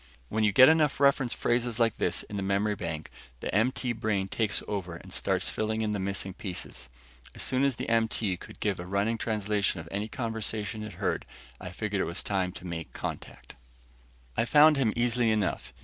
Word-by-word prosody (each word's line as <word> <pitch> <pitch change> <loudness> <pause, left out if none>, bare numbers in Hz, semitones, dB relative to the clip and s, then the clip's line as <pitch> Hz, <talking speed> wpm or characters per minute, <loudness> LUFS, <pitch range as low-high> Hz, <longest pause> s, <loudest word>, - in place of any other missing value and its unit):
When 110 0 0
you 105 - +4
get 130 +6 +9
enough 155 -4 +4
reference 140 -3 +4
phrases 120 -1 0
like 115 -2 +2
this 85 - +1
in 105 - -8
the 100 - -2
memory 100 +2 +1
bank, 85 -5 -5 0.3
the - - -4
MT 125 +3 +1
brain 105 -4 -1
takes 110 -1 0
over 95 -5 -3
and - - -11
starts - - +1
filling 110 +1 -1
in 105 - 0
the 105 - -1
missing 95 0 -2
pieces. 90 - -6 0.5
As - - -3
soon 130 +1 +1
as 140 -2 +2
the - - -5
MT 110 -4 +1
could - - -12
give 100 -4 0
a 90 - -6
running 100 +4 0
translation 105 -4 0
of 80 - -8
any 105 +2 -2
conversation 110 -2 -3
it 105 -2 -6
heard, 95 +2 -1 0.4
I 90 - -6
figured 100 +1 -2
it - - +1
was 85 - -3
time 95 -3 0
to 95 - -10
make 85 -2 -5
a - - -12
contact. - - -6 0.8
I - - +2
found 150 +4 +7
him 130 -6 +2
easily 120 0 +2
enough. 105 -4 0
105 Hz, 200 wpm, -29 LUFS, 95-115 Hz, 0.8 s, get